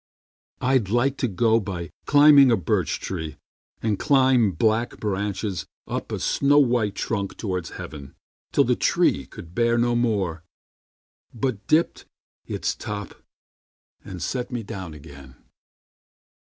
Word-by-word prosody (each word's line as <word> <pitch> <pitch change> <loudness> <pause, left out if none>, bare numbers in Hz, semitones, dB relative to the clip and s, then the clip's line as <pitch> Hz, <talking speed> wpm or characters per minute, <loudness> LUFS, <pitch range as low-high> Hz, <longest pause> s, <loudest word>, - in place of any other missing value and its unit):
I'd 125 -6 +2
like 130 +5 +1
to 125 - 0
go 115 +2 +2
by 95 -4 -5 0.2
climbing 145 -2 +7
a 115 - +4
birch 90 - -1
tree, 80 -5 -5 0.5
And 110 -3 0
climb 130 -7 +3
black 110 +7 0
branches 100 -1 -3 0.2
up - - -4
a - - -2
snow 140 +1 +2
white 120 -7 +2
trunk 100 -3 -3
Toward 90 -6 -3
heaven, 70 -3 -9 0.4
till - - +4
the - - +2
tree 70 -3 +1
could 85 0 -12
bear 115 +2 +2
no 120 0 +2
more, 100 -9 0 0.9
But 115 -3 -3
dipped 160 +2 +1 0.4
its - - -2
top 105 -2 -6 0.9
and 90 -4 -7
set 125 -1 -3
me 120 -3 -4
down 95 -5 -7
again. 70 -3 -13
110 Hz, 130 wpm, -24 LUFS, 95-120 Hz, 0.9 s, climbing